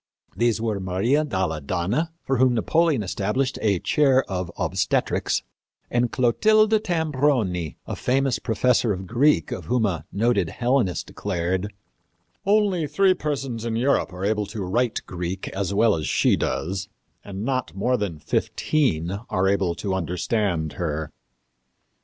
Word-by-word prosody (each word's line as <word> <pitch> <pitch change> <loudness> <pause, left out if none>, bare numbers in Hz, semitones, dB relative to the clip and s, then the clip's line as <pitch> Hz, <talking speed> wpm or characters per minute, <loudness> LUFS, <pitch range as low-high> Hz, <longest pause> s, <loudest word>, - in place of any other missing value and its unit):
These 120 -1 +1
were 110 -3 -1
Maria 100 +11 +1
dalle 95 - -2
Donne, 95 - -1 0.2
for 135 - 0
whom 125 0 +4
Napoleon 155 +1 +2
established 105 +8 -1
a 100 -3 +2
chair 135 - +3
of 90 -3 -3
obstetrics, - - 0 0.5
and 120 -1 +1
Clotilda 215 - +4
Tambroni, 140 - 0
the - - -4
famous 135 0 +1
professor 115 0 +2
of 95 0 -6
Greek, 120 - +2
of - - -5
whom 120 -2 +1
a 95 -5 -2
noted 100 -4 +1
Hellenist 120 -5 0
declared, 95 +1 -2 0.8
"Only 200 -6 +2
three 195 +4 +3
persons 135 -8 -3
in 115 -1 -2
Europe 125 -3 +1
are 90 +2 -5
able 105 -1 0
to 105 -1 -5
write 115 +5 0
Greek 90 +1 -4
as 95 0 -3
well 105 +2 +4
as 80 -5 -2
she - - +3
does, 95 +4 -2 0.3
and 100 +1 -6
not 130 - -2
more 125 +6 +1
than 100 -8 -3
fifteen 90 - 0 0.2
are 95 +1 +1
able 95 -3 +1
to 95 +1 -3
understand 90 -2 -1
her." 80 -1 -2
110 Hz, 140 wpm, -24 LUFS, 95-130 Hz, 0.8 s, whom